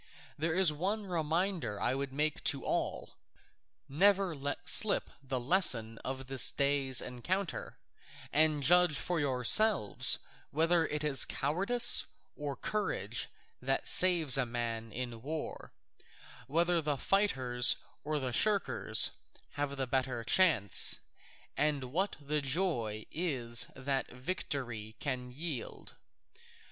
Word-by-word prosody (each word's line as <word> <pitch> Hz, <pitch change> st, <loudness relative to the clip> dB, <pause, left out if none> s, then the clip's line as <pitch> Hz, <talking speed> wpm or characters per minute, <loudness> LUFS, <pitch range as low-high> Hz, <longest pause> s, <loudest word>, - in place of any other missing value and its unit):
There 160 Hz, +2 st, -3 dB
is 185 Hz, -4 st, +3 dB
one 200 Hz, +7 st, -3 dB
reminder 170 Hz, -, -3 dB
I 125 Hz, -, -1 dB
would 135 Hz, 0 st, -5 dB
make 150 Hz, +2 st, -3 dB
to -, -, -1 dB
all. -, -, -4 dB, 0.7 s
Never 190 Hz, +4 st, +1 dB
let 145 Hz, +4 st, -6 dB
slip 215 Hz, +3 st, +6 dB
the 135 Hz, -2 st, -4 dB
lesson 120 Hz, -, +2 dB
of 130 Hz, 0 st, -7 dB
this 130 Hz, 0 st, +3 dB
day's 140 Hz, -2 st, +2 dB
encounter, 175 Hz, +10 st, -5 dB, 0.6 s
and 155 Hz, -1 st, +3 dB
judge 175 Hz, 0 st, +3 dB
for 175 Hz, -2 st, -3 dB
yourselves 140 Hz, -, +4 dB, 0.3 s
whether 165 Hz, +2 st, +1 dB
it 150 Hz, 0 st, -4 dB
is 145 Hz, -3 st, +3 dB
cowardice 195 Hz, -, +3 dB, 0.3 s
or 145 Hz, -2 st, -6 dB
courage 210 Hz, +10 st, -4 dB, 0.3 s
that -, -, -2 dB
saves 170 Hz, -7 st, +5 dB
a 130 Hz, -, 0 dB
man 115 Hz, -1 st, -5 dB
in 120 Hz, 0 st, -6 dB
war, 155 Hz, +4 st, -7 dB, 0.8 s
whether 170 Hz, +3 st, 0 dB
the 145 Hz, -2 st, -3 dB
fighters 130 Hz, -11 st, +1 dB, 0.3 s
or 150 Hz, +1 st, -3 dB
the 130 Hz, -4 st, -4 dB
shirkers 205 Hz, -, +1 dB, 0.4 s
have 145 Hz, -1 st, -4 dB
the 135 Hz, -, -2 dB
better 130 Hz, -2 st, -3 dB
chance, 150 Hz, -, +4 dB, 0.6 s
and 145 Hz, -4 st, -2 dB
what 190 Hz, +5 st, -1 dB
the 150 Hz, +1 st, -3 dB
joy 135 Hz, -, -2 dB
is 130 Hz, -9 st, 0 dB
that 135 Hz, 0 st, -3 dB
victory 125 Hz, -, -6 dB
can 125 Hz, -3 st, -5 dB
yield. 140 Hz, -1 st, -7 dB
145 Hz, 120 wpm, -31 LUFS, 130-175 Hz, 0.8 s, slip